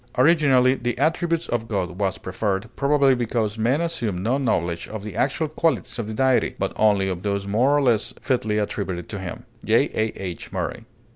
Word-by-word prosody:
"Originally 130 -3 +5
'the 120 -2 -3
attributes 165 +3 0
of 115 -1 -2
God' 95 -4 -3
was 95 -2 0
preferred, 95 +2 -2
probably, 140 -1 +3
because 115 -3 -1
men 125 +8 +2
assumed 120 - -2
no 120 +8 0
knowledge 85 -10 -1
of 110 -2 -7
the 105 -3 -7
actual 150 +4 0
qualities 155 -6 -1
of 110 - -3
the 110 - -5
Deity, 130 +2 +2
but - - -2
only 105 -3 +3
of 90 -2 -3
those 100 0 -2
more 125 +8 +3
or 145 - +2
less 115 -4 +2
fitly 110 -5 0
attributed 95 -4 -3
to 105 - -5
him." 95 +6 -6 0.2
J. 115 +6 +3
A. 110 0 0
H. 90 -3 -6
MURRAY. - - -4
115 Hz, 190 wpm, -23 LUFS, 100-135 Hz, 0.2 s, Originally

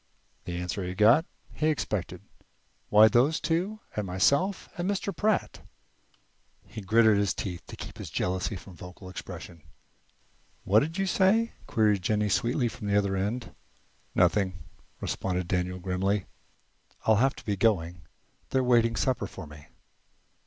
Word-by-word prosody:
The 85 - -4
answer 90 +3 -3
he 90 0 -4
got 115 - +5 0.3
he 155 - 0
expected. 100 - -2 0.7
"Why, 105 +1 +8
those 125 +8 +3
two, 180 +7 -1
and 105 -2 -2
myself 140 - +1
and 175 +2 -2
Mr. 200 0 -2
Pratt." 215 -1 0 1.0
He 110 - -8
gritted 110 +1 +4
his 100 -1 +1
teeth 90 -3 -5
to - - -8
keep - - -9
his - - -6
jealousy 95 +3 -1
from 95 0 -11
vocal 90 +2 -11
expression. 90 -2 -9 1.0
"What 105 +3 +5
did 160 - -3
you 195 - +1
say?" 200 +5 +2
queried 110 -7 +2
Jennie 105 +2 +1
sweetly 120 +5 +1
from 105 -2 -6
the 100 0 +3
other 100 -1 +1
end. 105 +6 -3 0.6
"Nothing," 95 -4 +2 0.4
responded 90 -2 -2
Daniel, 90 0 -1
grimly. 95 +2 -1 0.8
"I'll 110 -1 +5
have 135 +4 +2
to - - -13
be 105 - 0
going. 90 -5 +1 0.5
They're 130 -1 +1
waiting 115 -2 +3
supper 125 -6 0
for 95 - -9
me." 75 -1 -13
105 Hz, 145 wpm, -28 LUFS, 95-130 Hz, 1.0 s, Why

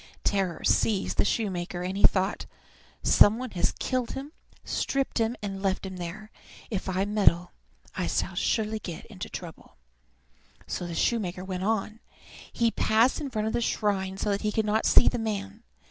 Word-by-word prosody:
Terror 190 -4 0
seized 205 -4 +2
the - - +4
shoemaker, 180 -5 -2
and 185 +1 -3
he 200 - -3
thought, 190 +1 +3 0.6
"Some 210 +2 +6
one 255 -1 -5
has 175 - 0
killed 255 -2 -1
him, 275 +3 -6 0.3
stripped 275 -3 -1
him, 225 +1 +1
and 195 -1 -4
left 195 -1 0
him 190 -1 -6
there. 180 +5 -7 0.4
If 195 -2 -3
I 190 +1 0
meddle 195 -4 +3 0.4
I - - -1
shall - - -1
surely 220 -1 0
get 175 -6 -7
into 190 - -7
trouble." 170 -3 -9 0.9
So 175 - -4
the 170 - -5
shoemaker 185 -5 0
went 185 0 -3
on. 220 0 -1 0.5
He 230 -1 +1
passed 225 +8 +2
in 285 - -3
front 215 -4 -2
of 220 - -1
the 240 - 0
shrine 195 -4 0
so 205 +1 -1
that 200 - -1
he 210 - 0
could 220 0 0
not 215 +1 +1
see - - +7
the 245 - +2
man. 210 -1 -4
205 Hz, 175 wpm, -27 LUFS, 190-220 Hz, 0.9 s, see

